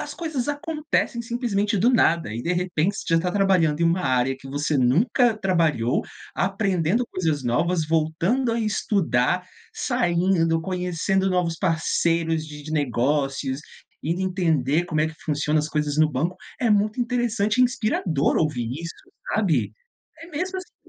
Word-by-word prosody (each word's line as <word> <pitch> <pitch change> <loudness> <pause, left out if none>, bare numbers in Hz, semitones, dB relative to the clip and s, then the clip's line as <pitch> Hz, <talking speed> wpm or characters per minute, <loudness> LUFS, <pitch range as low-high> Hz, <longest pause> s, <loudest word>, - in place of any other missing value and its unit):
As - - -6
coisas 315 -7 -3
acontecem 300 -4 -1
simplesmente 230 -3 -1
do 220 +6 +4
nada, 170 - +2
e 115 - -4
de 170 - 0
repente 180 +1 0
você 165 - -1
já - - +3
tá 180 +1 -1
trabalhando 180 -6 +2
em - - +3
uma 170 +2 +2
área 130 -3 +1
que 135 - -11
você 145 +1 -1
nunca 220 - +3
trabalhou, 165 - +1 0.3
aprendendo 195 +1 0
coisas 160 -6 -1
novas, 160 +8 +1
voltando 165 +11 +1
a 230 - -1
estudar, 180 - +1 0.3
saindo, 170 -2 +1
conhecendo 185 +1 0
novos 180 -3 0
parceiros 165 -2 0
de 150 -1 -9
de 155 - -9
negócios, 135 0 0 0.4
ir 170 +4 -2
entender 170 -5 +1
como 155 -3 -1
é 160 - +2
que 160 - -10
funciona 150 0 0
as 150 - -1
coisas 150 -1 -1
no 155 0 +5
banco, 165 +7 -1 0.2
é 240 - +2
muito 210 +3 +2
interessante 235 -3 0
e - - +7
inspirador 215 - 0
ouvir 130 -8 0
isso, 170 0 -6 0.4
sabe. 150 - +1 0.5
É 330 - -11
mesmo 365 +5 -3
assim 370 - -11
170 Hz, 155 wpm, -24 LUFS, 150-210 Hz, 0.5 s, e